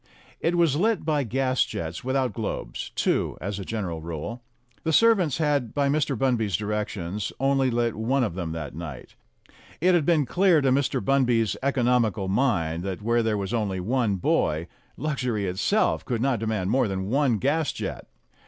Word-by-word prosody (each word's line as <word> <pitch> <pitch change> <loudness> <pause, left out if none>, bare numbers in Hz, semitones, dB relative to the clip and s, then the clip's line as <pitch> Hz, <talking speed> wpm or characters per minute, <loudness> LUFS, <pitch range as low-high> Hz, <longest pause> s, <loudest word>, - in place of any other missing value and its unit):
It 170 +2 +1
was 165 -5 +3
lit 215 0 +1
by 150 -2 +1
gas 130 +2 +1
jets 80 +1 -5
without 130 0 0
globes, 110 -3 -4
two - - 0
as 100 +1 -4
a - - -4
gen 110 +2 -3
eral 85 -3 -4
rule. 85 +9 -5 0.4
The 160 - 0
servants 190 - +4
had 145 -7 0
by 140 -1 +2
Mr. 145 -2 +1
Bunby's 115 -8 +1
direc 105 +1 -2
tions 100 +2 -4
only 135 0 +2
lit 120 -1 0
one 125 +5 +1
of 105 - -1
them 85 -3 -4
that 80 -3 -5
night. 75 -5 -8 0.7
It 180 +3 +4
had 175 -3 +3
been 155 -2 +3
clear 175 +5 +4
to 135 -2 +2
Mr. 140 +1 +1
Bunby's 125 -5 +2
economical 125 -7 +1
mind 95 -8 +1
that 95 +2 -5
where 115 +1 +2
there 110 -2 0
was 100 +2 -3
only 105 -5 -1
one 110 +1 0
boy, 80 -3 +1 0.3
luxury 125 -8 -1
itself 95 - +1
could 120 -3 -2
not 130 -1 +1
demand 105 -3 -1
more 130 -1 +3
than 95 +1 -3
one 135 -4 +2
gas 145 +6 +1
jet. - - -6
120 Hz, 180 wpm, -25 LUFS, 100-140 Hz, 0.7 s, servants